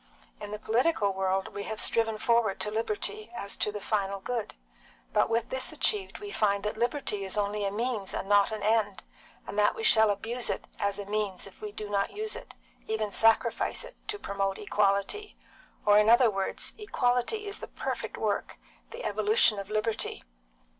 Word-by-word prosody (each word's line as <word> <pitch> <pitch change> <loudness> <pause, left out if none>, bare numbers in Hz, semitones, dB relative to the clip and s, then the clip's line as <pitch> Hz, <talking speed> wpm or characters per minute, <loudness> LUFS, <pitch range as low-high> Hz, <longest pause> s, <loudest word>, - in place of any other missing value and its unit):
In 205 - -7
the 210 - -4
political 220 -1 +1
world 190 0 0
we 200 - -6
have 220 -1 -4
striven 225 -1 +2
forward 230 -2 +2
to 210 - 0
liberty 420 - -1
as 200 - -4
to 210 - 0
the 210 - -5
final 200 -2 -1
good, 235 +2 -3 0.6
but - - +3
with 230 +1 0
this 260 0 -1
achieved 410 -3 +1
we 410 0 -7
find 200 - +1
that 210 - -2
liberty 235 -3 -1
is 190 +2 -2
only 205 0 0
a 195 - 0
means 220 -2 -2
and - - -3
not 205 +1 +4
an 215 -1 -4
end, 215 -2 +1 0.4
and 205 - -3
that 210 - +4
we 450 - -5
shall 220 - +6
abuse 225 +4 -1
it - - -2
as 200 0 0
a 205 - -5
means 205 -2 -2
if 195 - -14
we 210 - -5
do 210 0 -6
not 200 -1 0
use 430 +1 -2
it, - - -10 0.3
even 220 -1 -1
sacrifice 225 +2 +2
it, - - -11
to 420 -1 -1
promote 195 - -2
equality; 205 - 0 0.5
or 205 0 +7
in 210 +1 +4
other 235 0 +6
words, 195 -1 -2
equality 250 - 0
is 405 0 -3
the - - -7
perfect - - -4
work, - - -2 0.3
the 480 +2 -8
evolution 420 - +3
of 200 0 -7
liberty. 215 +1 -1
215 Hz, 190 wpm, -29 LUFS, 200-240 Hz, 0.6 s, or